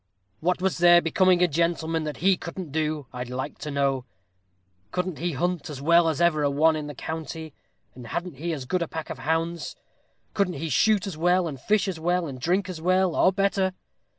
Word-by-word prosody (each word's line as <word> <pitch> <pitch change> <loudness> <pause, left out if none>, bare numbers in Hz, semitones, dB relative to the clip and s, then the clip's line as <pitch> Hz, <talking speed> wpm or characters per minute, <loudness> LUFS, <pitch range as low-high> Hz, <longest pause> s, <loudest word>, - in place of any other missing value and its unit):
What 180 +3 0
was 190 -2 0
there 175 0 +7
becoming 180 +1 +3
a - - +5
gentleman 165 0 0
that 150 - -4
he 195 -1 +6
couldn't 170 -2 -7
do, 155 -1 -1
I'd 125 0 -5
like 130 +1 -5
to 150 - -5
know? 140 -3 0 0.9
Couldn't 180 -3 -2
he 170 +1 -1
hunt 175 +2 -2
as 145 -3 -6
well 170 +3 +4
as 155 - -2
ever 170 -3 +3
a 145 - +2
one 155 +3 +3
in 150 -1 -4
the 145 - -7
county? 160 +1 -6 0.4
and 125 -2 -10
hadn't 170 +3 -4
he 170 +4 -3
as 140 -5 -4
good 180 +7 -1
a 170 - -1
pack 160 0 -6
of - - -7
hounds? 165 +2 -2 0.6
Couldn't 195 -4 0
he 165 - -4
shoot 210 - +3
as 190 -6 -5
well, 180 +1 +3
and 135 -5 -7
fish 210 +4 +2
as 180 -4 -3
well, 175 +2 +1
and 135 -4 -7
drink 180 +6 +1
as 180 -4 -6
well, 185 0 +2
or 185 - +4
better? 195 -1 +1
165 Hz, 210 wpm, -25 LUFS, 150-180 Hz, 0.9 s, there